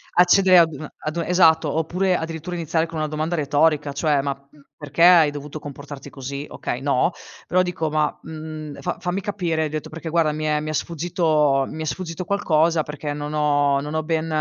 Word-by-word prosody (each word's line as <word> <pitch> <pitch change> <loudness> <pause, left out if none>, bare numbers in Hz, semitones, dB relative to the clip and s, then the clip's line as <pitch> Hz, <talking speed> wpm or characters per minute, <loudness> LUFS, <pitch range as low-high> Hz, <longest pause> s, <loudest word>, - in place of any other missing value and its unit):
accedere 180 +1 +6
ad 165 -1 +4
una 150 +1 -8
ad 155 +1 -5
u - - +1
esatto, 165 -3 +4
oppure 180 +4 +1
addirittura 165 +1 -4
iniziare 165 -1 0
con 165 -1 -6
una 155 - 0
domanda 155 +3 -2
retorica 150 0 +2
cioè: 145 -1 +1
"Ma, 140 0 -1 0.2
mhmm, 150 - -20 0.2
perché 150 +2 -5
hai 170 -4 +7
dovuto 145 +1 -7
comportarti 145 -1 -9
così?" 140 +1 -6
Okay 125 - -5
no, 140 +1 +2 0.4
però 185 0 +3
dico: 170 -3 -2
"Ma, 150 0 0
mhmm, 155 -2 -8
fa 175 - -3
fammi 180 +2 -2
capire, 175 -5 -1
hai 155 - -2
detto 155 0 -5
perché 160 +1 -7
guarda 160 -2 +2
mi 155 +1 -4
è 150 -1 +1
mi 155 +1 -5
è - - -2
sfuggito 155 -4 +1
mi 160 - -7
è - - -3
sfuggito 170 +2 -4
qualcosa 165 -4 +2
perché 150 0 -5
non 145 +1 -5
ho 145 -2 +2
non 150 +2 -5
ho 155 - 0
ben 160 0 -1
155 Hz, 205 wpm, -22 LUFS, 150-170 Hz, 0.4 s, hai